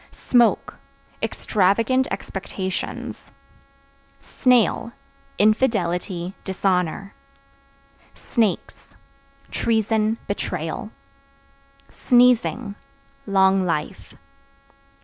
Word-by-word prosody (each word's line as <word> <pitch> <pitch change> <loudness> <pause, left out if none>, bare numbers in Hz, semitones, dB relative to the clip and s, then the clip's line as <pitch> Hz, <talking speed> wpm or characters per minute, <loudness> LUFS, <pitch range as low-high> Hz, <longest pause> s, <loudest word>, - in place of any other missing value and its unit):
Smoke 240 -2 +2 0.4
Extravagant 225 +7 +1
expectations. 190 -1 -5 0.9
Snail 240 -2 +1 0.4
Infidelity, 190 -5 +1
dishonor. 190 0 -1 1.0
Snakes 225 -6 -2 0.6
Treason, 220 -1 +1
betrayal. - - -3 1.0
Sneezing 245 -3 +3 0.5
Long 190 -1 +3
life. 165 -4 -3
205 Hz, 50 wpm, -22 LUFS, 190-235 Hz, 1.0 s, Sneezing